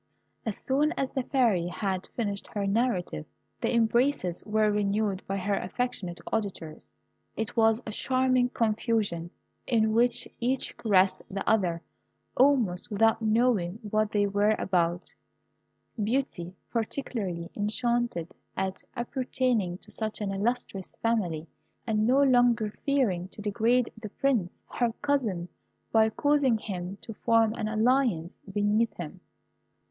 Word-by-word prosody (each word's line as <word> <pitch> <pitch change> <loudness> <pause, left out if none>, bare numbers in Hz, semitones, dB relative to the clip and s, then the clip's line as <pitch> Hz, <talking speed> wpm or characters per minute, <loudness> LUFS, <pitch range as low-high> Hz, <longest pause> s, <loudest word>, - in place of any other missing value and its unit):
As 215 - -1
soon 290 +4 +1
as 270 - -2
the 265 - -1
Fairy 235 -10 +2
had 190 0 -3
finished 205 -4 -2
her 205 -1 -3
narrative, 195 - 0 0.3
the - - 0
embraces 235 -5 +2
were 215 0 +3
renewed 205 -1 0
by 195 - -1
her 200 +2 -1
affectionate 195 -5 -2
auditors. 195 -8 -3 0.5
It 220 -1 -3
was 225 +1 +3
a 215 - -4
charming 255 +1 +2
confusion, 215 -7 0 0.4
in 220 -3 +2
which 240 +1 +2
each 255 +2 -1
caressed 190 -4 +3
the 195 0 -4
other 180 -6 +2 0.5
almost 245 -10 +3
without 225 +2 +3
knowing 220 -5 +2 0.2
what 215 0 +1
they 205 -1 +2
were 205 +2 +2
about: 175 -2 0 0.9
beauty, 205 -7 -2 0.2
particularly, 215 -7 -3
enchanted 220 -4 -1 0.2
at 190 0 -2
appertaining 240 -6 -1
to 210 - -14
such 215 0 -3
an 205 -2 -2
illustrious 195 -2 -2
family, 185 -9 -1 0.4
and 215 -1 +1
no 270 +3 +5
longer 245 -5 +3
fearing 220 -11 +1
to 200 - -12
degrade 230 +4 +2
the 215 - -6
Prince, 230 -7 0
her 240 -2 0
cousin, 230 -12 0 0.4
by 220 -1 +5
causing 285 -1 +2
him 190 -2 -5
to 225 - -7
form 225 0 +3
an 215 - -3
alliance 220 -6 +1
beneath 210 +3 +1
him. 170 -4 -7
215 Hz, 130 wpm, -28 LUFS, 195-240 Hz, 0.9 s, no